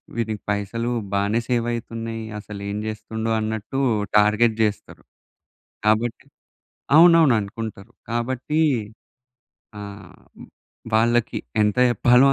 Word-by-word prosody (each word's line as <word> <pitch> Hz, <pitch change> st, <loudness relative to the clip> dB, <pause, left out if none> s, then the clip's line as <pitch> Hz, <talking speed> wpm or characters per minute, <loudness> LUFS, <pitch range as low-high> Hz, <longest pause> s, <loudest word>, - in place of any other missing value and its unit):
వీడికి 110 Hz, -3 st, -2 dB
పైసలు 105 Hz, +4 st, -2 dB, 0.2 s
బానే 100 Hz, +3 st, +1 dB
సేవ్ 120 Hz, -2 st, 0 dB
అయితున్నయి. 115 Hz, -1 st, -5 dB, 0.2 s
అసలు 105 Hz, -1 st, -9 dB
ఏం 100 Hz, -, -3 dB
చేస్తుండు" 110 Hz, +1 st, -4 dB
అన్నట్టు 110 Hz, +4 st, -3 dB, 0.4 s
టార్గెట్ 105 Hz, +2 st, +4 dB
చేస్తరు. 105 Hz, -1 st, -3 dB, 0.8 s
కాబట్టి 110 Hz, +2 st, +1 dB, 0.7 s
అవునవును 165 Hz, -6 st, +7 dB
అనుకుంటరు. 105 Hz, -1 st, -7 dB, 0.2 s
కాబట్టి 130 Hz, +6 st, -1 dB, 1.2 s
ఆహ్, 100 Hz, -1 st, -10 dB, 0.8 s
వాళ్ళకి 120 Hz, +1 st, +2 dB, 0.2 s
ఎంత 105 Hz, -1 st, +1 dB
చెప్పాలో, 125 Hz, +3 st, +5 dB
115 Hz, 90 wpm, -22 LUFS, 105-120 Hz, 1.2 s, అవునవును